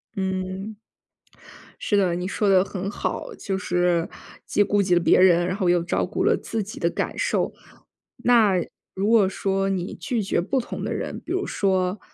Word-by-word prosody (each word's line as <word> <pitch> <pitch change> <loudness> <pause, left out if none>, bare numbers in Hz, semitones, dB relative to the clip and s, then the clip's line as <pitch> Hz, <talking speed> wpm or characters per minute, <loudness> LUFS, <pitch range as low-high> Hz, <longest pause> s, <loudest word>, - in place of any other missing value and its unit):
嗯。 190 +2 -3 1.1
是 205 - +2
的， 185 -3 +2
你 180 +1 -3
说 205 +1 -1
得 190 -2 +5
很 195 0 -5
好， - - -4
就 195 - -3
是 175 -2 +1 0.4
既 - - +1
顾 205 0 +1
及 185 -2 +1
了 175 - +5
别 - - +4
人， 175 -2 +5
然 185 +1 -2
后 190 -3 0
又 175 0 +3
照 175 - 0
顾 - - -2
了 - - +3
自 225 - -3
己 205 +1 -7
的 170 - +1
感 - - -3
受。 - - 0 0.7
那 230 -5 +5 0.4
如 195 +3 0
果 225 -4 +5
说 195 0 -1
你 190 -1 -2
拒 235 -4 -2
绝 195 - 0
不 255 +10 0
同 - - -7
的 - - -2
人， - - -4
比 335 - -6
如 375 +1 -1
说 190 0 0
190 Hz, 205 characters per minute, -24 LUFS, 180-205 Hz, 1.1 s, 得